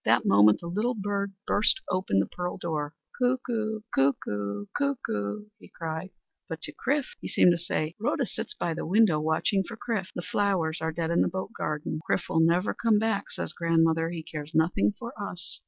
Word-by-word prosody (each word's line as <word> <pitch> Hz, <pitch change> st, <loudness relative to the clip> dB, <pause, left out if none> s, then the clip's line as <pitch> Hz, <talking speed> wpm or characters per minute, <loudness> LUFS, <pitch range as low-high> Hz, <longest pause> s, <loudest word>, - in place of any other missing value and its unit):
That -, -, +3 dB
moment 105 Hz, +1 st, +6 dB
the -, -, -8 dB
little 215 Hz, +8 st, 0 dB
bird 200 Hz, -1 st, -2 dB
burst 210 Hz, +5 st, +4 dB
open 185 Hz, -, +1 dB
the 100 Hz, -, +4 dB
pearl 180 Hz, 0 st, -4 dB
door. 155 Hz, -4 st, -3 dB, 0.2 s
"Cuckoo! 240 Hz, -4 st, 0 dB
cuckoo! 105 Hz, -7 st, 0 dB
cuckoo!" 210 Hz, -, -1 dB
he -, -, -14 dB
cried. 160 Hz, +2 st, -5 dB, 0.4 s
But 160 Hz, 0 st, -5 dB
to -, -, -3 dB
Chrif 280 Hz, +1 st, 0 dB
he -, -, -6 dB
seemed 180 Hz, -, +5 dB
to 175 Hz, -, +2 dB
say: 160 Hz, -2 st, -1 dB
"Rhoda 225 Hz, -, +1 dB
sits 425 Hz, -, -5 dB
by 170 Hz, -, -1 dB
the -, -, -4 dB
window 190 Hz, -4 st, +4 dB
watching 160 Hz, +5 st, +1 dB
for 225 Hz, +3 st, -8 dB
Chrif. 215 Hz, -5 st, -2 dB
The 175 Hz, -, -4 dB
flowers 185 Hz, -7 st, 0 dB
are 160 Hz, 0 st, 0 dB
dead 165 Hz, 0 st, -2 dB
in 170 Hz, -, +3 dB
the -, -, +3 dB
boat 190 Hz, +4 st, -4 dB
garden. 155 Hz, 0 st, -2 dB
'Chrif -, -, 0 dB
will 160 Hz, -, +2 dB
never 170 Hz, +4 st, +3 dB
come 225 Hz, -2 st, +3 dB
back,' 220 Hz, -1 st, 0 dB
says -, -, -4 dB
grandmother, 165 Hz, -1 st, +2 dB
'he 170 Hz, -2 st, -5 dB
cares 155 Hz, 0 st, -7 dB
nothing 170 Hz, +6 st, +3 dB
for 235 Hz, 0 st, -7 dB
us.'" 180 Hz, -3 st, -6 dB
175 Hz, 190 wpm, -28 LUFS, 160-210 Hz, 0.4 s, moment